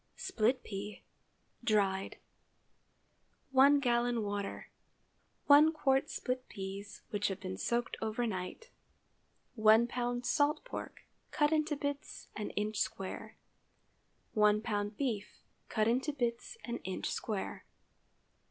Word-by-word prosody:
SPLIT 255 Hz, -, +1 dB
PEA 205 Hz, +1 st, -6 dB, 0.6 s
(dried). 200 Hz, -4 st, +2 dB
✠ -, -, -17 dB, 1.4 s
1 275 Hz, +2 st, +7 dB
gallon 240 Hz, -3 st, +1 dB
water. 205 Hz, -1 st, -4 dB, 0.7 s
1 295 Hz, +2 st, +8 dB
qt. 270 Hz, -3 st, +2 dB
split 255 Hz, 0 st, -3 dB
peas, 195 Hz, +1 st, -7 dB
which 205 Hz, -1 st, +1 dB
have 195 Hz, -1 st, -3 dB
been 185 Hz, -1 st, -5 dB
soaked 240 Hz, 0 st, -1 dB
over 225 Hz, +2 st, -1 dB
night. 215 Hz, -, -5 dB, 0.8 s
1 220 Hz, 0 st, +6 dB
lb. 245 Hz, 0 st, -2 dB
salt 290 Hz, -, +2 dB
pork, -, -, -7 dB, 0.3 s
cut 295 Hz, -2 st, +2 dB
into 310 Hz, -1 st, +1 dB
bits 285 Hz, 0 st, -5 dB
an 210 Hz, 0 st, -3 dB
inch 210 Hz, +1 st, 0 dB
square. 220 Hz, -4 st, -3 dB, 1.0 s
1 210 Hz, -1 st, +4 dB
lb. 205 Hz, -2 st, -2 dB
beef, 230 Hz, -8 st, -3 dB, 0.3 s
cut 215 Hz, -1 st, +2 dB
into 255 Hz, +6 st, +2 dB
bits 240 Hz, -, -2 dB
an 235 Hz, 0 st, -3 dB
inch 190 Hz, 0 st, -4 dB
square. 210 Hz, -4 st, -3 dB
235 Hz, 115 wpm, -33 LUFS, 205-265 Hz, 1.4 s, 1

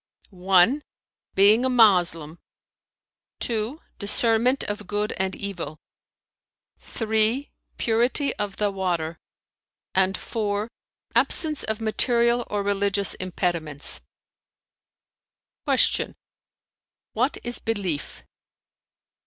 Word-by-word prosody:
"(1) 190 Hz, +8 st, +3 dB, 0.5 s
being 205 Hz, +5 st, +5 dB
a 260 Hz, -, +1 dB
Moslem; 175 Hz, -9 st, +3 dB, 1.0 s
(2) 230 Hz, +5 st, -2 dB, 0.2 s
discernment 230 Hz, +5 st, +3 dB
of 205 Hz, -3 st, -5 dB
good 210 Hz, +1 st, -1 dB
and 190 Hz, 0 st, -2 dB
evil; 175 Hz, -7 st, -5 dB, 1.0 s
(3) 220 Hz, +4 st, 0 dB, 0.3 s
purity 240 Hz, +5 st, +1 dB
of 205 Hz, -2 st, -4 dB
the 205 Hz, -1 st, 0 dB
water, 170 Hz, -4 st, -3 dB, 0.7 s
and 190 Hz, 0 st, +1 dB
(4) 210 Hz, -1 st, -3 dB, 0.4 s
absence 310 Hz, -3 st, +2 dB
of 220 Hz, 0 st, -3 dB
material 235 Hz, +2 st, +1 dB
or 205 Hz, -1 st, -2 dB
religious 200 Hz, -1 st, +2 dB
impediments." 170 Hz, -, -1 dB, 1.7 s
Q -, -, +1 dB, 1.0 s
"What 255 Hz, +6 st, 0 dB
is 240 Hz, 0 st, -2 dB
belief?" 195 Hz, -9 st, -4 dB
205 Hz, 85 wpm, -24 LUFS, 185-230 Hz, 1.7 s, being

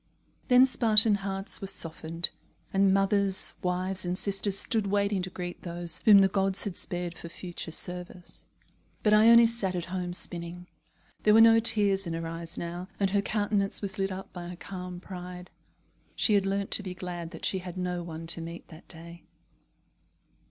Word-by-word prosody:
Then 250 Hz, 0 st, +6 dB
Spartan 220 Hz, -4 st, +6 dB
hearts 195 Hz, -1 st, -3 dB
were 195 Hz, -, -5 dB
softened, 165 Hz, -1 st, -1 dB, 0.4 s
and 195 Hz, 0 st, +3 dB
mothers, 195 Hz, 0 st, +2 dB
wives, 185 Hz, 0 st, 0 dB
and 180 Hz, 0 st, -2 dB
sisters 195 Hz, 0 st, 0 dB
stood 220 Hz, -1 st, 0 dB
waiting 200 Hz, -1 st, 0 dB
to 180 Hz, -, -5 dB
greet 180 Hz, -1 st, -7 dB
those 170 Hz, -1 st, -2 dB
whom 205 Hz, -3 st, +8 dB
the 195 Hz, -, +5 dB
gods 195 Hz, 0 st, -1 dB
had 195 Hz, -4 st, -5 dB
spared 175 Hz, -1 st, -4 dB
for 170 Hz, -, -9 dB
further 175 Hz, -1 st, -7 dB
service. 180 Hz, +1 st, -8 dB, 0.6 s
But 210 Hz, -, +3 dB
Ione 230 Hz, +2 st, +7 dB
sat 225 Hz, -5 st, -1 dB
at 175 Hz, -1 st, -3 dB
home 180 Hz, -1 st, -3 dB
spinning. 175 Hz, 0 st, -2 dB, 0.6 s
There 210 Hz, 0 st, +4 dB
were -, -, +7 dB
no 225 Hz, 0 st, +7 dB
tears 205 Hz, -4 st, +3 dB
in 165 Hz, -, -4 dB
her 165 Hz, 0 st, -4 dB
eyes 165 Hz, 0 st, -7 dB
now, 175 Hz, +2 st, -6 dB
and 195 Hz, -1 st, +1 dB
her 200 Hz, 0 st, +2 dB
countenance 205 Hz, 0 st, -1 dB
was 200 Hz, +1 st, -4 dB
lit 195 Hz, 0 st, -1 dB
up 190 Hz, +1 st, -8 dB
by 175 Hz, -1 st, -7 dB
a -, -, -8 dB
calm 180 Hz, 0 st, -8 dB
pride. 180 Hz, -1 st, -9 dB, 0.6 s
She 215 Hz, -, +2 dB
had 200 Hz, -1 st, +2 dB
learnt 195 Hz, 0 st, -2 dB
to -, -, +4 dB
be 185 Hz, -2 st, -7 dB
glad 175 Hz, -2 st, -6 dB
that 165 Hz, -2 st, -7 dB
she 190 Hz, -, 0 dB
had 180 Hz, 0 st, -9 dB
no 180 Hz, -1 st, -3 dB
one 165 Hz, -1 st, -8 dB
to 165 Hz, 0 st, +2 dB
meet 170 Hz, +1 st, -9 dB
that 160 Hz, +1 st, -14 dB
day. 170 Hz, 0 st, -10 dB
185 Hz, 180 wpm, -28 LUFS, 175-200 Hz, 0.6 s, whom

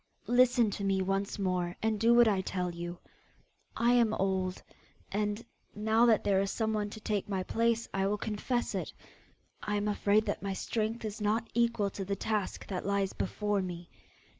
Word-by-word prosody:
Listen 245 Hz, -3 st, +5 dB
to 200 Hz, -, -4 dB
me 195 Hz, -1 st, +1 dB
once 195 Hz, +2 st, -1 dB
more, 180 Hz, -2 st, -1 dB
and 220 Hz, -1 st, +1 dB
do 230 Hz, +2 st, +4 dB
what 240 Hz, -1 st, +7 dB
I 200 Hz, -3 st, +2 dB
tell 180 Hz, -2 st, -2 dB
you. 175 Hz, +1 st, -6 dB, 0.8 s
I 235 Hz, +1 st, +4 dB
am 230 Hz, -3 st, +4 dB
old, 190 Hz, -1 st, -1 dB, 0.5 s
and 210 Hz, +2 st, -1 dB, 0.3 s
now 220 Hz, +3 st, +3 dB
that 220 Hz, -3 st, +4 dB
there 195 Hz, -1 st, +3 dB
is 195 Hz, -, -1 dB
someone 215 Hz, -1 st, -1 dB
to 215 Hz, -, -9 dB
take 210 Hz, -1 st, -2 dB
my 190 Hz, -2 st, -1 dB
place, 230 Hz, +3 st, +1 dB
I 195 Hz, 0 st, +1 dB
will 210 Hz, +1 st, 0 dB
confess 220 Hz, +4 st, -2 dB
it -, -, -3 dB, 0.7 s
I 210 Hz, -, -2 dB
am 205 Hz, 0 st, 0 dB
afraid 210 Hz, +1 st, +2 dB
that -, -, -2 dB
my 195 Hz, -1 st, -2 dB
strength 225 Hz, +3 st, -2 dB
is 215 Hz, 0 st, -5 dB
not 215 Hz, +2 st, +1 dB
equal 230 Hz, -3 st, +1 dB
to 195 Hz, -, -5 dB
the 200 Hz, +1 st, -2 dB
task 210 Hz, 0 st, -2 dB
that 185 Hz, -2 st, -4 dB
lies 200 Hz, -1 st, 0 dB
before 205 Hz, -1 st, -1 dB
me. 175 Hz, -2 st, -6 dB
205 Hz, 185 wpm, -31 LUFS, 195-220 Hz, 0.8 s, what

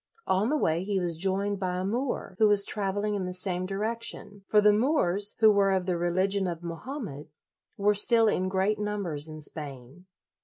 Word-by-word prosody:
On 195 Hz, +5 st, +1 dB
the 305 Hz, -, +1 dB
way 165 Hz, -, 0 dB
he 200 Hz, 0 st, -1 dB
was 175 Hz, -2 st, -1 dB
joined 195 Hz, +3 st, -1 dB
by 180 Hz, -2 st, -2 dB
a 185 Hz, -, -2 dB
Moor, 240 Hz, -1 st, -3 dB
who 215 Hz, -, +6 dB
was 205 Hz, -1 st, +5 dB
traveling 205 Hz, +1 st, -1 dB
in 195 Hz, -3 st, -2 dB
the 180 Hz, -, -5 dB
same 185 Hz, -1 st, -2 dB
direction; 210 Hz, 0 st, -3 dB
for 210 Hz, -, +4 dB
the 210 Hz, 0 st, +5 dB
Moors, 210 Hz, -, +1 dB
who 220 Hz, -1 st, +7 dB
were 200 Hz, -1 st, +3 dB
of 190 Hz, -1 st, 0 dB
the 180 Hz, -1 st, 0 dB
religion 185 Hz, +3 st, 0 dB
of 170 Hz, -1 st, -5 dB
Mohammed, 170 Hz, -, -7 dB, 0.5 s
were 205 Hz, 0 st, +3 dB
still 225 Hz, +2 st, +4 dB
in 185 Hz, -3 st, 0 dB
great 195 Hz, +3 st, 0 dB
numbers 195 Hz, -8 st, -2 dB
in 155 Hz, -1 st, -9 dB
Spain. 145 Hz, +2 st, -9 dB
195 Hz, 190 wpm, -27 LUFS, 180-210 Hz, 0.5 s, who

